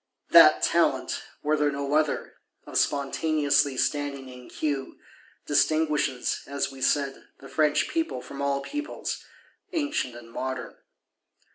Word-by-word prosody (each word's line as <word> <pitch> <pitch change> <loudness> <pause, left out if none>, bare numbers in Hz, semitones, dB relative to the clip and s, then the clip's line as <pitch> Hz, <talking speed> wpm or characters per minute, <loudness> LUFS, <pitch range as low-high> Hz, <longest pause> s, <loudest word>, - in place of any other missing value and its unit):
That - - +8
talent, - - +2 0.2
were 150 +1 +2
there 150 -1 +2
no 140 0 -3
other, 155 -1 +1 0.3
of - - -10
spontaneously 145 -1 +1
standing 140 -2 -1
in 125 -1 -12
queue, 140 -3 -3 0.5
distinguishes, 150 -3 +1
as 140 0 -2
we 135 -1 -11
said, 140 0 0
the 135 - -11
French 150 +1 +2
People 325 0 -2
from 140 - -8
all 140 0 0
Peoples, 295 - -5 0.5
ancient 290 - -1
and 115 -1 -12
modern. 130 0 -4
140 Hz, 125 wpm, -26 LUFS, 135-150 Hz, 0.5 s, That